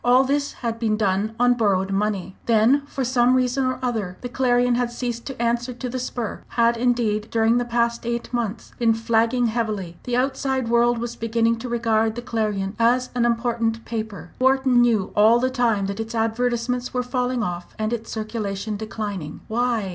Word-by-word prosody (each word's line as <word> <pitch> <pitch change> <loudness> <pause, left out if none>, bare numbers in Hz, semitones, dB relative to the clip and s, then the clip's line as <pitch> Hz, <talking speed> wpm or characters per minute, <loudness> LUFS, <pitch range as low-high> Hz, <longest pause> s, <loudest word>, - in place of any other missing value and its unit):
All 250 +2 +5
this 285 +2 0
had 230 -1 -2
been 220 -2 +1
done 210 +1 0
on 245 0 +5
borrowed 195 -5 +1
money. 195 -2 -1
Then, 235 +5 +4
for 270 - -3
some 250 0 +3
reason 255 +1 +1
or 255 0 -1
other, 215 -7 -2
the 245 - -5
Clarion 245 -1 +2
had 240 0 0
ceased 240 -1 -4
to 270 -4 -7
answer 240 +1 0
to 250 +1 -5
the 255 +1 -3
spur 245 -3 -4 0.2
had, 235 0 +4
indeed, 230 -3 0
during 225 +1 +3
the 245 - -1
past 235 0 0
eight 235 +1 -3
months 230 -2 -3
been 230 -2 +3
flagging 230 +2 +1
heavily. 215 -7 -2
The 245 -1 0
outside 265 -1 0
world 235 0 +3
was 235 0 -4
beginning 230 0 +1
to 250 +2 -6
regard 225 -2 +1
the 240 - -5
Clarion 210 -4 -2
as 245 +2 +2
an 245 -1 +1
important 230 -1 0
paper. 215 -6 -5
Wharton 260 -1 +4
knew 225 -5 +2
all 220 +3 +6
the 255 +1 0
time 230 -6 +1
that 200 +2 -4
its 225 +1 -4
advertisements 245 +2 -1
were 250 - +1
falling 250 -1 -1
off, 175 -2 -5
and 215 +1 -1
its 230 -1 -4
circulation 215 -2 -3
declining. 205 -7 -5
Why? 230 -3 0
235 Hz, 185 wpm, -23 LUFS, 220-245 Hz, 0.2 s, all